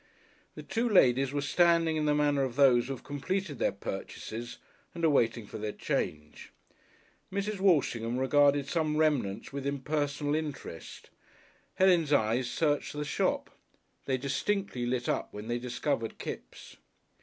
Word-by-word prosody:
The - - -8
two 235 +1 -1
ladies 135 - +4
were 145 0 -2
standing 165 +1 +3
in 155 -1 0
the 150 0 +3
manner 145 -1 +2
of 130 -3 -3
those 130 -4 +5
who 135 - -2
have 130 - -10
completed 145 +2 -3
their - - +2
purchases 110 +4 -6 0.4
and 170 -1 0
are - - +5
waiting 115 -4 +1
for 105 - -8
their 105 0 -3
change. 75 0 -4 0.8
Mrs. 200 +1 -2
Walshingham 125 - +2
regarded 140 +1 +3
some 155 -2 0
remnants 135 -10 0
with 140 0 -3
impersonal 145 +1 -1
interest; 150 - -6 0.6
Helen's 175 -5 +4
eyes 120 -1 +2
searched 145 0 0
the 150 0 -3
shop. - - -1 0.5
They 130 -1 0
distinctly 140 0 -1
lit 120 0 -1
up - - -1
when 105 +1 -7
they 120 +1 -1
discovered 125 -1 -2
Kipps. - - -8
140 Hz, 145 wpm, -30 LUFS, 120-155 Hz, 0.8 s, those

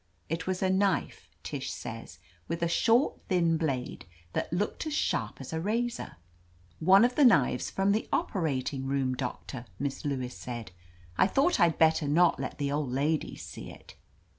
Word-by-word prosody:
It 165 +1 -3
was 185 0 -1
a 190 - +2
knife, 195 -1 0
Tish - - -4
says, - - -7 0.3
with 170 0 -2
a - - +3
short, 230 - +2
thin 170 -3 +3
blade 135 - -3 0.3
that - - -2
looked 205 - -2
as 305 - -2
sharp - - -1
as - - -7
a 160 - -1
razor. 235 +5 -2 0.6
"One 190 +7 +6
of 250 - +1
the 290 - +3
knives 145 - +4
from 195 +1 +1
the 215 +2 0
operating 140 - -1
nx>m. 135 -1 0
Doctor," 125 0 -5
Miss 140 +2 -3
Lewis 130 -4 -3
said. 120 -4 -7 0.5
"I - - +6
thought 275 - +2
I'd 170 -2 +4
bet 160 0 +5
ter 150 - -2
not 170 +4 +4
let - - -4
the 140 -1 -1
old 145 -3 -1
ladies 145 +4 -1
see - - -8
it." - - -13
165 Hz, 175 wpm, -29 LUFS, 140-195 Hz, 0.6 s, One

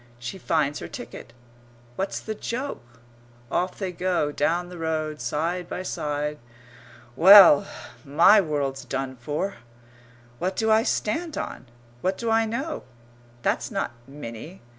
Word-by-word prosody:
She 120 +11 -7
finds 150 -4 0
her 85 - -6
ticket. - - -9 0.6
What's 195 +1 -2
the 220 - -5
joke? 230 - -6 0.5
Off 180 +1 -1
they 190 -3 -3
go, 180 -4 0
down 170 +5 0
the 180 -1 -9
road, 155 -2 -2
side 170 +4 -2
by 185 - -4
side.... 150 -3 -3 0.8
Well, 185 -2 +9 0.4
my 170 +9 +6
world's 140 -4 -2
done 135 -1 -4
for! 150 +10 -3 0.8
What 185 +2 -1
do 220 0 +1
I 220 0 +6
stand 315 +9 -1
on? - - -5 0.3
What 185 +1 0
do 230 -1 -2
I 225 0 +3
know? 270 +8 -3 0.6
That's - - 0
not - - -2 0.2
Minnie. 140 +4 -9
170 Hz, 135 wpm, -25 LUFS, 145-200 Hz, 0.8 s, Well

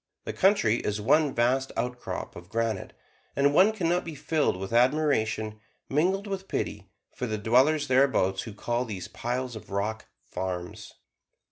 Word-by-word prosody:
The - - -4
country 185 - +3
is 105 -3 -2
one 145 +7 +3
vast 130 +3 +2
outcrop 125 0 -4
of 85 +1 -11
granite; 115 -3 -2 0.4
and 140 +1 +3
one 190 +7 +6
can 190 -6 -2
not 175 +1 +3
but - - -4
be 165 -2 -6
filled 145 - 0
with 95 +3 -6
admiration, 120 -5 +2 0.3
mingled 185 +8 +1
with 195 -1 -5
pity, - - -3 0.2
for 125 - -4
the 110 -1 -2
dwellers 130 +8 +3
thereabouts 130 -8 +3
who 110 - -8
call 120 +3 -1
these 105 -7 -6
piles 125 +1 -3
of 110 - -10
rock 105 +3 -2 0.2
"farms." 90 -2 -5
125 Hz, 160 wpm, -27 LUFS, 110-150 Hz, 0.4 s, one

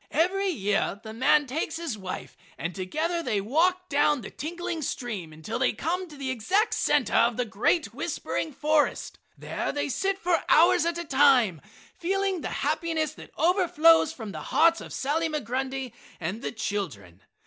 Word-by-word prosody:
Every 375 +6 +2
year 205 - 0
the 220 -1 -8
man 265 +5 +3
takes 310 +4 -3
his 330 -8 -3
wife, 190 -3 -7 0.2
and 165 +2 -4
together 310 - -2
they 215 -10 0
walk 350 - +1
down 290 -2 +2
the - - -8
tinkling 335 +1 -4
stream 220 - -4
until 155 0 -5
they - - +2
came 360 - -2
to 300 - -12
the 270 -2 -3
exact 370 - +1
center - - +1
of - - +3
the 250 - 0
great 225 - 0
whispering 320 - -3
forest; 300 +2 0 0.2
there - - -3
they 290 0 -2
sit 390 +8 0
for 350 -3 +1
hours 330 0 +5
at 340 0 -1
a 340 - -4
time, 265 - +4 0.3
feeling 385 0 -1
the - - -3 0.2
happiness 320 -3 0
that - - -12
overflows 330 -2 +4
from 225 -9 -7
the - - -7
hearts 335 +1 +3
of - - -9
Sally 320 +4 -1
Migrundy 265 -2 -3 0.3
and 185 +7 -4
the - - -3
children. 150 - -4
295 Hz, 170 wpm, -27 LUFS, 220-335 Hz, 0.3 s, hours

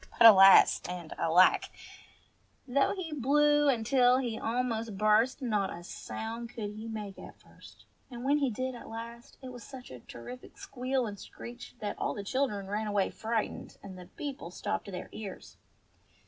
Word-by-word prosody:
But, 235 - +6
alas, 195 -3 +9
and 175 -3 -6
alack! 175 +3 +5 1.0
Though 275 +8 +2
he 345 -5 -5
blew 295 -2 +3
till 250 +1 +4
he 240 -4 -2
almost 230 -3 -2
burst, 215 +6 +3
not 210 -5 0
a 175 - -8
sound 230 +5 -6
could 215 -3 -5
he 215 +2 -8
make 210 -3 -6
at - - -12
first, - - -17 0.2
and 240 -2 -8
when 285 +2 +2
he 275 -2 +1
did 255 +3 -3
at 240 - -10
last, 230 +1 -9
it 260 - -6
was 245 -2 -10
such 260 - -11
a 125 - -9
terrific 185 - -11
squeal 255 0 -2
and 205 -2 -6
screech 240 +5 -10
that 205 -1 -4
all - - -1
the 205 - -5
children 210 -3 -1
ran 210 +2 -3
away 205 -2 0
frightened, 225 -1 -3
and 195 -2 -9
the 180 -1 -11
people 270 - -7
stopped 210 +3 -4
their 180 -1 -6
ears. 200 -4 -9
230 Hz, 170 wpm, -30 LUFS, 205-255 Hz, 1.0 s, alas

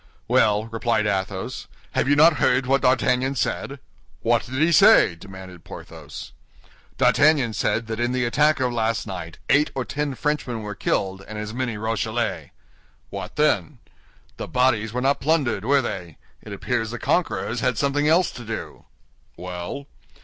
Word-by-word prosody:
"Well," 105 0 +3
replied 115 -1 0
Athos, 95 -1 -3 0.2
"have - - 0
you 145 - +5
not 155 +1 +6
heard 130 +1 +2
what 135 +1 +2
D'Artagnan 130 +1 +2
said?" - - -2 0.5
"What 115 0 +2
did 130 - -8
he 160 +5 +3
say?" 200 - +6
demanded 95 -1 -11
Porthos. - - -10 0.6
"D'Artagnan 145 -6 +4
said 110 +2 0
that 110 0 -5
in 120 +1 0
the 125 -1 0
attack 150 +5 +2
of 125 -2 0
last 115 -1 0
night 90 -5 -7
eight 145 +2 +3
or 130 -2 -2
ten 145 -1 -3
Frenchmen 125 -6 -2
were 105 0 -5
killed, 95 -1 -2
and 110 - -7
as 105 +1 -5
many 120 -3 -2
Rochellais." 110 -1 -2 0.6
"What - - -6
then?" 150 -2 +1 0.6
"The - - -5
bodies 125 -4 +1
were 125 +2 -2
not 135 +2 +1
plundered, 135 -9 +1
were 140 +1 +3
they? 90 -7 -6 0.2
It - - -11
appears 115 -1 -2
the 120 - -5
conquerors 115 - -1
had 125 -2 0
something 145 +3 +1
else 170 +3 +3
to 120 - -9
do." 115 0 -7 0.5
"Well?" 90 +9 -6
120 Hz, 160 wpm, -23 LUFS, 105-140 Hz, 0.6 s, not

